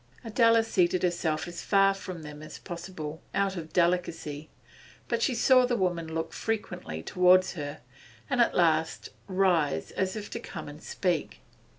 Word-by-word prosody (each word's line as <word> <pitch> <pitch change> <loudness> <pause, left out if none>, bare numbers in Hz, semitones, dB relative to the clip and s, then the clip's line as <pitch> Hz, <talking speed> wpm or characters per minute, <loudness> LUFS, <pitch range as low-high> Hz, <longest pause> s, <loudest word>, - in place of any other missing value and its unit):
Adela 230 0 +4
seated 185 -5 +1
herself 170 -3 0
as 175 0 -6
far 195 -1 +4
from 185 -4 -8
them 150 0 -9
as 155 - -9
possible, 170 -3 -7
out 195 -1 +1
of 160 -3 -7
delicacy, 165 -4 0 0.6
but - - -1
she 260 - +1
saw 255 +2 +5
the 250 -1 +1
woman 175 -4 -1
look 165 0 -3
frequently 180 - -4
towards 180 - +4
her, 150 -3 -6 0.5
and 245 - +2
at 235 - +3
last 160 -2 +2 0.2
rise 180 - +1
as 190 +1 -1
if 210 -1 -5
to - - -4
come 170 -8 -8
and 145 +1 -10
speak. 175 -5 -2
180 Hz, 160 wpm, -28 LUFS, 160-195 Hz, 0.6 s, saw